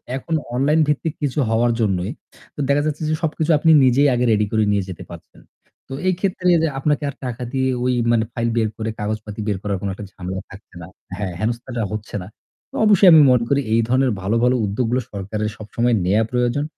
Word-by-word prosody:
এখন 160 +5 -5 0.2
অনলাইন 150 +5 +2
ভিত্তিক 150 +1 -1
কিছু 145 +1 -1
হওয়ার 120 +1 +2
জন্যই 95 0 0 0.4
তো - - -12
দেখা 145 +1 +3
যাচ্ছে 155 0 -3
যে - - +1
সবকিছু 160 +1 0
আপনি 160 0 +4
নিজেই 135 +3 +4
আগে 125 0 +1
রেডি 105 0 +2
করে 110 -1 +2
নিয়ে 100 -2 +1
যেতে 90 - -8
পারছেন। - - -13 0.5
তো 135 - -8
এই 185 - +3
ক্ষেত্রে 185 -2 -1 0.2
যে - - +3
আপনাকে 150 +1 0
আর - - -8
টাকা 125 0 -4
দিয়ে 130 0 +1
ওই 125 0 +1 0.2
মানে 115 -1 +3
ফাইল 115 0 -1
বের 110 -2 +1
করে 110 0 -3
কাগজপাতি 105 0 -4
বের 100 -2 0
করার 100 -2 -1
কোন 100 - -3
একটা 100 +1 -8
ঝামেলা 95 0 -5
থাকছে 100 - -15
না 80 - -9 0.3
হ্যাঁ, 95 -4 -3
হেনস্থাটা 120 +2 -3
হচ্ছে 105 0 -6
না। - - -10 0.4
তো - - -12
অবশ্যই 200 -3 +6
আমি 160 -2 +8
মনে 120 -2 +3
করি 140 0 +2
এই 115 - +4
ধরনের 130 +1 +2
ভালো 100 +5 -1
ভালো 125 +1 +3
উদ্যোগগুলো 120 +5 -1
সরকারের 105 +2 -3
সবসময় 115 +2 0
নেয়া 105 +4 +3
প্রয়োজন 125 +3 0
120 Hz, 205 wpm, -20 LUFS, 105-140 Hz, 0.5 s, আমি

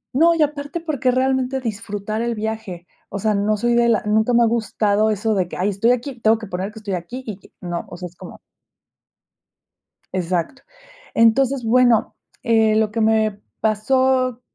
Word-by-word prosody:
No, 335 +4 +5
y 320 - +3
aparte 290 +2 -3
porque 305 -6 -1
realmente 260 +1 +1
disfrutar 215 -2 -4
el 235 0 -1
viaje, 215 -5 -5 0.2
o - - -5
sea, 215 +2 +1
no 210 +1 +1
soy 240 +3 +1
de 235 0 +3
la 225 - +2
nunca 220 +3 +2
me 240 0 +5
ha - - +5
gustado 220 -2 +1
eso 215 +1 0
de 185 -4 0
que, - - -8
ay, 190 +3 +1
estoy 205 +4 +1
aquí, 250 +1 -2
tengo 220 +1 +4
que 220 - -8
poner 190 +1 -4
que 220 - -15
estoy 210 -3 -5
aquí 185 +9 -5
y 210 -4 -6
que - - -20
no, 175 -1 -4
o 175 - -9
sea 180 - -7
es 175 - -18
como. 180 0 -11 1.8
Exacto, 180 +7 -2 0.5
entonces 250 +3 +3
bueno, 240 -1 +3 0.3
eh, 220 -2 +3
lo 215 -1 +2
que 225 - -1
me 215 -2 +1 0.2
pasó, 255 +3 +1
220 Hz, 185 wpm, -21 LUFS, 205-250 Hz, 1.8 s, No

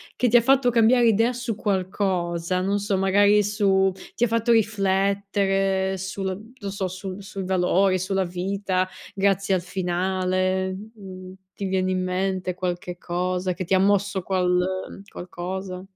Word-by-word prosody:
che 250 - +1
ti 240 - +6
ha - - +5
fatto 265 +1 +4
cambiare 235 +1 +4
idea 225 +3 +3
su 240 -3 -3
qualcosa, 185 -3 -1
non 200 +2 0
so 205 0 -1
magari 205 +2 +4
su 195 -2 +2 0.2
ti 240 - 0
ha 240 - +4
fatto 230 +1 +2
riflettere 195 -2 +1
sul 195 +4 -5
non 200 -1 -4
so, 195 -1 -2
su 185 +1 -7
sui 195 -1 -7
valori, 185 +1 +2
sulla 190 +1 0
vita, 185 +1 -1 0.3
grazie 195 0 +1
al 180 - -1
finale? 185 +1 -1 0.2
Mhmm, 185 -2 -10 0.2
ti 200 - -5
viene 185 0 0
in 185 0 0
mente 185 0 -1
qualche 180 -1 -4
cosa 180 +1 -2
che 185 +1 -5
ti 190 - -1
ha 190 - +5
mosso 200 0 +2
qual 180 -1 +1 0.5
qualcosa? 185 +1 -6
190 Hz, 150 wpm, -24 LUFS, 185-200 Hz, 0.5 s, ti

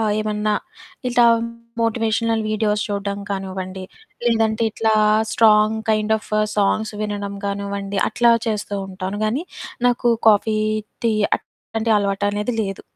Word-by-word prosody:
ఆహ్, 215 -2 +1
ఏమన్నా 210 0 0 0.5
ఇట్టా 240 -1 +4 0.6
మోటివేషనల్ 225 0 +1
వీడియోస్ 210 -1 0
చూడడం 200 0 -3
కానివ్వండి, 190 -1 -4 0.4
లేదంటే 225 -1 +2
ఇట్లా 220 0 +1 0.4
స్ట్రాంగ్ 215 -1 +4
కైండ్ 215 0 +2
ఆఫా 215 0 -1 0.2
సాంగ్స్ 210 +1 +1
వినడం 205 -1 -4
కానివ్వండి, 200 0 -3
అట్లా 240 -1 +4 0.2
చేస్తూ 205 -1 -2
ఉంటాను 190 +2 -5
గానీ, 255 +11 -1 0.4
నాకు 240 0 +2 0.2
కాఫీ, 215 +1 +3 0.5
టీ 230 - +3 0.3
అట్లాంటి 225 0 -4
అలవాటనేది 205 +3 -1
లేదు. 195 -2 -5
215 Hz, 115 wpm, -21 LUFS, 200-220 Hz, 0.6 s, ఇట్టా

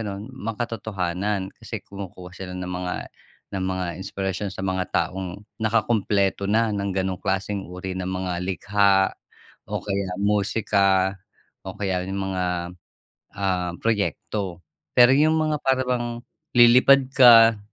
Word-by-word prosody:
ganon, 105 +2 -6
makatotohanan 105 -5 -3
kasi - - -6
kumukuha 95 -2 -9
sila 95 0 -8
ng 90 0 -5
mga 90 0 -3 0.6
ng 95 -1 -2
mga 95 -1 -2
inspirasyon 95 0 -3
sa - - -6
mga 95 -1 -1
taong 95 +1 -2 0.2
nakakumpleto 105 -3 +1
na 110 +1 +2
ng 100 -1 -2
ganong 95 -1 -1
klaseng 95 +1 -2
uri 90 +1 -6
ng 90 - -3
mga 95 -1 -3
likha 95 0 +2 0.6
o - - -1
kaya 100 -2 -3
musika 100 -2 +2 0.5
o 95 - -6
kaya 95 -3 -1
yung 95 +1 -4
mga, 90 -1 -1 0.9
ah, 90 -3 -1
proyekto, 100 -4 -2 0.3
pero 120 0 +7
yung 155 +3 +4
mga 155 -1 +1
parang 130 -1 +1
bang 120 -1 0 0.5
lilipad 125 +3 +7
ka. 115 -3 +8
100 Hz, 130 wpm, -24 LUFS, 95-110 Hz, 0.9 s, ka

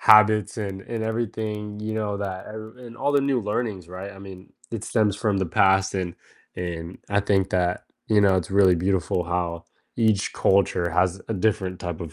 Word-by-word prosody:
habits, 105 -1 +6
and 95 -2 -4
and 115 +1 -4
everything, 105 -2 -3
you 110 +1 -3
know, 105 -2 -1
that 95 -2 -4
ev 110 +2 -9
and 120 -2 -10
all 145 - 0
the 140 - +4
new 135 -3 +1
learnings, 105 -4 -3
right, 95 +3 -7
I 95 - -13
mean, 95 -1 -11 0.2
it 115 -2 -4
stems 105 -4 +1
from 105 -2 0
the 95 - 0
past 95 +3 +3
and 90 -3 -2 0.4
and 85 -1 -5
I 100 0 +2
think 95 -1 +1
that, 90 -1 0 0.2
you 105 -1 +4
know, 95 -2 +5
it's 90 -1 -2
really 95 -2 +5
beautiful 90 0 0
how 85 -1 -2 0.3
each 110 -4 +2
culture 95 -3 +2
has 90 +2 +1
a - - 0
different 95 -2 0
type 85 -3 -4
of 80 -4 -7
100 Hz, 195 wpm, -24 LUFS, 90-110 Hz, 0.4 s, habits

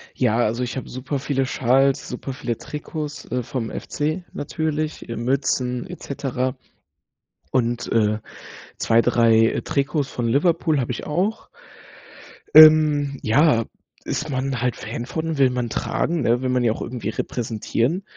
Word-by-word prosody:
Ja, 115 -3 +2
also 120 +1 +1
ich 125 - -4
habe 130 - -6
super 130 +3 -4
viele 135 -1 0
Schals, 135 +2 +2
super 130 +2 -5
viele 125 -4 -3
Trikots, 150 0 -6
äh, 125 0 -1
vom 120 -1 -4
FC 155 +5 -3
natürlich, 155 +1 -3
äh, 115 - -3
Mützen, 125 +1 -1
et 180 - -9
cetera 130 -2 -2 1.0
und, 120 -1 0
äh, 105 -2 +2 0.6
2, 115 +1 +3
3 115 -2 +3
Trikots 140 0 0
von 120 -2 -2
Liverpool 155 +3 +2
habe 125 -1 -2
ich - - -6
auch. 185 +9 -1 1.1
Ähm, 150 -2 +7
ja, 115 0 +3 0.4
ist 155 - -3
man 135 -1 -2
halt 125 -1 0
Fan 120 +2 -6
von, 160 +3 -3
will 135 -2 +5
man 125 -2 -2
tragen, 165 +7 -1
ne, 120 +1 +2
will 130 - -1
man 125 -1 +1
ja 115 - +3
auch - - -9
irgendwie 120 -3 -4
repräsentieren. 115 - -2
130 Hz, 150 wpm, -22 LUFS, 120-150 Hz, 1.1 s, Ähm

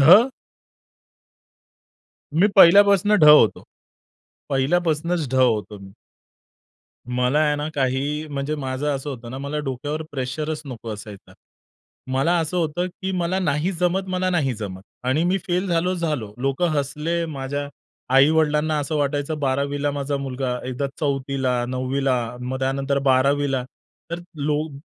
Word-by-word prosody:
ढ. 195 - +8 2.0
मी 175 +6 +4
पहिल्यापासून 200 +2 +7
ढ - - +4
होतो. 115 -10 +6 0.9
पहिल्यापासूनच 160 +3 0
ढ - - -7
होतो 110 -5 +1
मी. 95 0 -12 1.2
मला 125 +4 +2
आहे 150 -1 +2
ना, 150 +1 -3
काही 140 +3 -1
म्हणजे 145 +1 -3
माझं 135 0 -3
असं 135 +2 -5
होतं 120 -3 -7
ना, 130 - -6
मला 140 +2 -3
डोक्यावर 145 +4 -3
प्रेशरच 150 +3 -3
नको 120 -4 -8
असायचा. 105 -1 -11 0.8
मला 140 +7 +2
असं 165 +2 -2
होतं, 175 +2 -1
की 190 +1 -5
मला 180 0 -1
नाही 160 0 0
जमत, 180 +2 0
मला 185 0 0
नाही 150 -8 +1
जमत. 95 -3 -6 0.2
आणि 130 +6 +1
मी 180 +2 +2
फेल 180 +2 0
झालो, 175 +1 +1
झालो. 150 - -3
लोकं 135 +6 +1
हसले. 150 +4 -1
माझ्या 145 -1 -4 0.5
आई-वडिलांना 150 +2 +3
असं 145 +2 -3
वाटायचं, 145 +1 -1
12वीला 140 +1 0
माझा 140 0 -2
मुलगा 130 -2 -3
एकदा 130 +2 -2
4थीला, 135 -3 -1
9वीला 130 +1 -1 0.3
मग 130 +1 -4
त्यानंतर 135 +1 0
12वीला. 135 0 +2 0.5
तर 170 - -3 0.2
लोग 150 0 -2
145 Hz, 130 wpm, -22 LUFS, 130-160 Hz, 2.0 s, ढ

